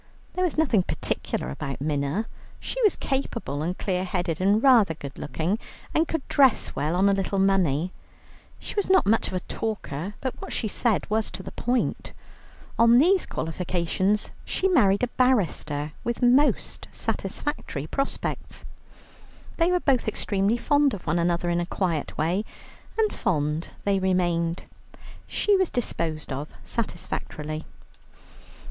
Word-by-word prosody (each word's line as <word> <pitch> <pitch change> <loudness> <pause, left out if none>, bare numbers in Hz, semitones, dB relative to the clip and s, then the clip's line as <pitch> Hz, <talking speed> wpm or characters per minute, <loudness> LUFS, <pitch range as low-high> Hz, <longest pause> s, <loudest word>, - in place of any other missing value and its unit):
There 365 - 0
was 350 -4 0
nothing 265 -11 +4
particular 65 - -3
about 135 - -5
Minna. 145 +7 -1 0.3
She - - -4
was 425 -4 +4
capable, 235 - -2
and 175 +4 -2
clear 185 -2 -1
headed, 180 -3 -2
and 205 +4 +3
rather 230 -11 +6
good 140 -3 -8
looking, 170 +8 -1 0.3
and 320 +1 +3
could 325 -4 -3
dress 270 -5 +3
well 155 +4 0
on 190 +2 +4
a - - +5
little 195 0 -1
money. 185 -4 +2 0.7
She - - -7
was 410 -2 -1
not 380 0 +5
much 225 +2 +3
of - - -4
a 180 - -1
talker, 205 -5 -4
but 260 -2 -2
what - - -6
she 225 - -1
said 220 0 0
was 220 +1 +1
to 190 - -7
the - - -7
point. 245 +1 -1 0.7
On 230 +1 +7
these 360 +7 +4
qualifications 180 +4 -1
she 380 - 0
married 220 - +4
a - - +3
barrister 175 - +1
with 235 +1 -2
most 260 +5 +3
satisfactory 150 - -3
prospects. 275 - -3 0.9
They 335 +1 +3
were 360 - +3
both 270 -8 +1
extremely 205 +1 +1
fond 285 -1 +3
of 185 - -11
one 160 +2 +1
another 170 0 +1
in 170 - +1
a 175 - 0
quiet 170 -6 -2
way, 175 +7 +1 0.5
and 440 -1 +2
fond 150 -1 -1
they 200 -1 +2
remained. 175 -2 +1 0.6
She 415 - +2
was 375 -2 +2
disposed 160 - -2
of 140 +3 -4
satisfactorily. 155 -7 -4
195 Hz, 150 wpm, -26 LUFS, 165-250 Hz, 0.9 s, On